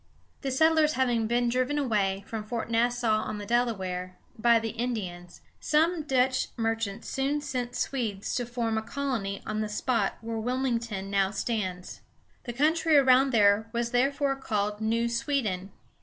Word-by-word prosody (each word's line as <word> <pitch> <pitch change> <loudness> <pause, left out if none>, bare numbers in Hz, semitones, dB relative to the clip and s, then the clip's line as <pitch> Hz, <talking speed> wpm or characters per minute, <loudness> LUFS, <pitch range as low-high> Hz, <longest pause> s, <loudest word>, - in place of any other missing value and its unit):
The 275 - -2
settlers 315 +2 +3
having 240 -4 +1
been 240 +1 +1
driven 255 +4 0
away 200 -8 0
from 220 0 -5
Fort 230 +1 -4
Nassau, 235 -1 +2
on 215 - -4
the 205 - -6
Delaware, 190 -6 -1 0.2
by 235 +1 +4
the 225 -1 -2
Indians, 200 -8 -5 0.2
some 320 +2 +2
Dutch 260 -3 +1
merchants 225 -2 -2
soon 275 +2 0
sent 250 -4 -4
Swedes 220 -9 -2
to 245 -2 -1
form 230 -2 -1
a - - -5
colony 225 -6 -3
on 215 0 -2
the 215 - -2
spot 215 -1 0
where 225 0 -4
Wil´ming 245 +1 -1
ton 195 -4 -5
now 195 -1 +2
stands. 190 -5 -3 0.4
The 240 - -3
country 315 +3 +3
around 265 0 +5
there 215 -2 +4
was 235 0 -1
therefore 275 +2 +1
called 210 -5 -2
New 230 +2 +1
Sweden. 230 -6 -1
235 Hz, 155 wpm, -28 LUFS, 210-260 Hz, 0.4 s, around